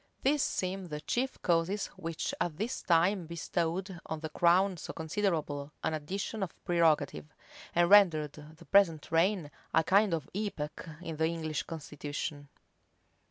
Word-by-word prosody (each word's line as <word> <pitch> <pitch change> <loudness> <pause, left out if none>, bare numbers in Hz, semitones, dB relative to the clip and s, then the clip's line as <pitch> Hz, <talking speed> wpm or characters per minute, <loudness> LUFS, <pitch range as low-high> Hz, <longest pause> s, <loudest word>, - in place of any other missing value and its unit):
These 285 +2 +3
seem 185 -3 -2
the 150 -2 -5
chief 260 - -1
causes 175 +3 +1
which 165 -4 -3
at 170 -3 -1
this 225 +5 -2
time 175 +1 +2
bestowed 170 +2 -2
on 160 -1 -4
the 160 - -4
crown 180 +4 +3
so - - -7
considerable 155 -5 -2
an - - 0
addition 195 +8 -3
of 190 - -3
prerogative, 155 - +2 0.5
and 175 0 +5
rendered 170 -7 +6
the 155 +3 -13
present 170 -7 +3
reign 165 -2 +2 0.2
a 160 - +5
kind 195 +1 +4
of 155 -4 -6
epoch 185 -6 -4
in 165 -2 -5
the 160 +1 +2
English 160 -3 -2
constitution. 145 -2 -6
165 Hz, 145 wpm, -31 LUFS, 155-190 Hz, 0.5 s, rendered